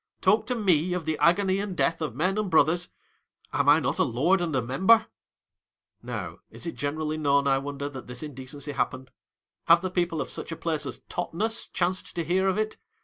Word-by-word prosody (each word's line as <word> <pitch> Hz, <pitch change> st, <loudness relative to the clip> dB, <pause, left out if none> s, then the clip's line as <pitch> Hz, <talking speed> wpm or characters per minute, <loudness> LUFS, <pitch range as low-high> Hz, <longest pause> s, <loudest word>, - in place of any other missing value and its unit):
Talk 215 Hz, +1 st, +3 dB
to 250 Hz, -, 0 dB
me 180 Hz, -6 st, +2 dB
of 180 Hz, -3 st, -3 dB
the 160 Hz, 0 st, 0 dB
agony 185 Hz, +4 st, +3 dB
and 200 Hz, -3 st, -4 dB
death 165 Hz, 0 st, +1 dB
of 150 Hz, -7 st, -3 dB
men 180 Hz, +7 st, +1 dB
and 210 Hz, -3 st, -1 dB
brothers! 165 Hz, +2 st, +3 dB, 0.6 s
Am 140 Hz, -1 st, +2 dB
I 150 Hz, +2 st, +7 dB
not 140 Hz, -1 st, -2 dB
a -, -, +5 dB
Lord 155 Hz, +10 st, +2 dB
and 165 Hz, -4 st, -1 dB
a 130 Hz, -, +2 dB
Member! 190 Hz, -, +4 dB, 1.0 s
Now, -, -, -6 dB
is -, -, -7 dB
it 170 Hz, -, -3 dB
generally 155 Hz, +2 st, -2 dB
known, 140 Hz, -2 st, +2 dB
I 135 Hz, -1 st, +3 dB
wonder, 140 Hz, 0 st, -4 dB
that 135 Hz, -3 st, -8 dB
this 125 Hz, +4 st, -7 dB
indecency 140 Hz, 0 st, -6 dB
happened? 130 Hz, -2 st, -3 dB, 0.5 s
Have 170 Hz, +1 st, +6 dB
the 185 Hz, -, -2 dB
people 175 Hz, -3 st, 0 dB
of -, -, -3 dB
such -, -, -5 dB
a -, -, -3 dB
place 160 Hz, -3 st, -2 dB
as -, -, -7 dB
TOTNES 210 Hz, +6 st, -1 dB
chanced 180 Hz, +1 st, -2 dB
to 170 Hz, -, -1 dB
hear 185 Hz, +4 st, +1 dB
of 190 Hz, +1 st, +1 dB
it 215 Hz, 0 st, -2 dB
165 Hz, 205 wpm, -27 LUFS, 145-185 Hz, 1.0 s, I